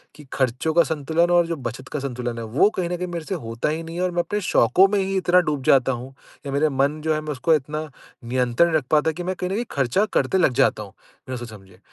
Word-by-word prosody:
कि 150 Hz, -, -13 dB
खर्चों 130 Hz, +4 st, 0 dB
का 170 Hz, +1 st, +5 dB
संतुलन 160 Hz, +3 st, 0 dB
और 175 Hz, -1 st, +4 dB
जो 165 Hz, -, -2 dB
बचत 130 Hz, +3 st, -8 dB
का 150 Hz, -, -1 dB
संतुलन 125 Hz, -3 st, -4 dB
है 115 Hz, -, -5 dB
वो 200 Hz, -, +6 dB
कहीं 175 Hz, -2 st, -1 dB
न 175 Hz, -, -2 dB
कहीं 180 Hz, +1 st, -4 dB
मेरे 170 Hz, -2 st, -5 dB
से 190 Hz, -, -3 dB
होता 115 Hz, +5 st, -2 dB
ही 160 Hz, +2 st, -3 dB
नहीं 165 Hz, 0 st, -8 dB
है 175 Hz, -, -3 dB
और 185 Hz, -, 0 dB
मैं 175 Hz, -, -2 dB
अपने 210 Hz, +3 st, -3 dB
शौकों 175 Hz, +12 st, +5 dB
में 200 Hz, +1 st, 0 dB
ही 195 Hz, 0 st, -1 dB
इतना 180 Hz, -1 st, +4 dB
डूब 150 Hz, -6 st, -1 dB
जाता 130 Hz, 0 st, +4 dB
हूँ, 125 Hz, +2 st, -6 dB, 0.3 s
कि 140 Hz, -, -6 dB
मेरा 145 Hz, +3 st, +2 dB
मन 140 Hz, +2 st, 0 dB
जो 160 Hz, 0 st, 0 dB
है 155 Hz, -, -2 dB
मैं 155 Hz, 0 st, -5 dB
उसको 145 Hz, +4 st, +1 dB
इतना 155 Hz, +2 st, -3 dB, 0.4 s
नियंत्रण 125 Hz, +5 st, +2 dB
नहीं 160 Hz, -2 st, +2 dB
रख 145 Hz, -, -4 dB
पाता 155 Hz, +1 st, +3 dB
कि 175 Hz, +3 st, -6 dB
मैं 185 Hz, +1 st, -2 dB
कहीं 180 Hz, -, -4 dB
न -, -, -2 dB
कहीं 230 Hz, +4 st, -1 dB
खर्चा 140 Hz, -, +1 dB
करते 190 Hz, -, +2 dB
लग 170 Hz, -8 st, +3 dB
जाता 130 Hz, -5 st, +2 dB
हूँ, 100 Hz, -, -12 dB, 0.4 s
बिना 130 Hz, -, -4 dB
सोचे-समझे। 100 Hz, -6 st, -11 dB
155 Hz, 270 wpm, -23 LUFS, 130-175 Hz, 0.4 s, वो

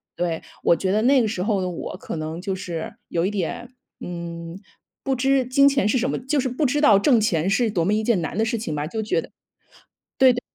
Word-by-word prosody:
对， 170 Hz, -2 st, -2 dB, 0.2 s
我 -, -, +5 dB
觉 185 Hz, +2 st, -1 dB
得 210 Hz, +2 st, +2 dB
那 265 Hz, +1 st, +5 dB
个 225 Hz, -, +1 dB
时 195 Hz, -4 st, -2 dB
候 205 Hz, -2 st, 0 dB
的 185 Hz, -, -2 dB
我 175 Hz, -, -6 dB
可 -, -, -6 dB
能 155 Hz, +2 st, -5 dB
就 190 Hz, 0 st, -2 dB
是 170 Hz, -3 st, -6 dB
有 170 Hz, -, 0 dB
一 -, -, +1 dB
点， 205 Hz, +4 st, -3 dB, 0.3 s
嗯， 170 Hz, 0 st, -7 dB, 0.4 s
不 270 Hz, -, 0 dB
知 265 Hz, +1 st, +2 dB
金 275 Hz, +3 st, +5 dB
钱 275 Hz, -6 st, +1 dB
是 215 Hz, -, +2 dB
什 260 Hz, -, 0 dB
么， -, -, -1 dB
就 275 Hz, +3 st, -1 dB
是 260 Hz, 0 st, 0 dB
不 255 Hz, +5 st, -1 dB
知 285 Hz, +3 st, +1 dB
道 215 Hz, -9 st, +6 dB
挣 235 Hz, +1 st, +4 dB
钱 175 Hz, -5 st, +1 dB
是 230 Hz, +3 st, +2 dB
多 170 Hz, -5 st, 0 dB
么 200 Hz, -, +2 dB
一 215 Hz, -, +1 dB
件 215 Hz, -5 st, +2 dB
难 -, -, -4 dB
的 220 Hz, -, +2 dB
事 230 Hz, +1 st, -1 dB
情 210 Hz, -8 st, -4 dB
吧， 150 Hz, +1 st, -2 dB
就 220 Hz, +5 st, -3 dB
觉 215 Hz, -, 0 dB
得 -, -, -13 dB, 0.9 s
对 260 Hz, -1 st, +7 dB
对， 245 Hz, -, -3 dB
210 Hz, 265 characters per minute, -23 LUFS, 175-255 Hz, 0.9 s, 对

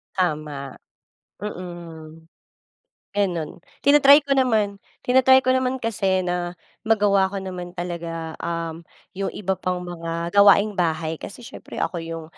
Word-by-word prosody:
Tama, 150 Hz, -6 st, -2 dB, 0.7 s
mm. 165 Hz, -5 st, -8 dB, 0.9 s
Ganon 175 Hz, -6 st, -1 dB, 0.2 s
tina-try 285 Hz, 0 st, +7 dB
ko 280 Hz, -1 st, 0 dB
naman 220 Hz, -6 st, +2 dB, 0.2 s
tina-try 260 Hz, +1 st, +5 dB
ko 255 Hz, -, -5 dB
naman 260 Hz, 0 st, +1 dB
kasi 195 Hz, -5 st, 0 dB
na 175 Hz, -1 st, -2 dB, 0.3 s
magawa 200 Hz, -3 st, +3 dB
ko 195 Hz, -, -3 dB
naman 180 Hz, -2 st, -6 dB
talaga, 170 Hz, -2 st, -5 dB
um, 165 Hz, 0 st, -4 dB, 0.3 s
yung 195 Hz, 0 st, -2 dB
iba 190 Hz, -2 st, -2 dB
pang 180 Hz, 0 st, -2 dB
mga 170 Hz, -1 st, -4 dB
gawaing 200 Hz, 0 st, +6 dB
bahay 160 Hz, -2 st, 0 dB
kasi 200 Hz, -, -9 dB
siyempre 235 Hz, -, -9 dB
ako 180 Hz, -, -1 dB
yung, 165 Hz, -1 st, -6 dB
180 Hz, 125 wpm, -23 LUFS, 165-210 Hz, 0.9 s, tina-try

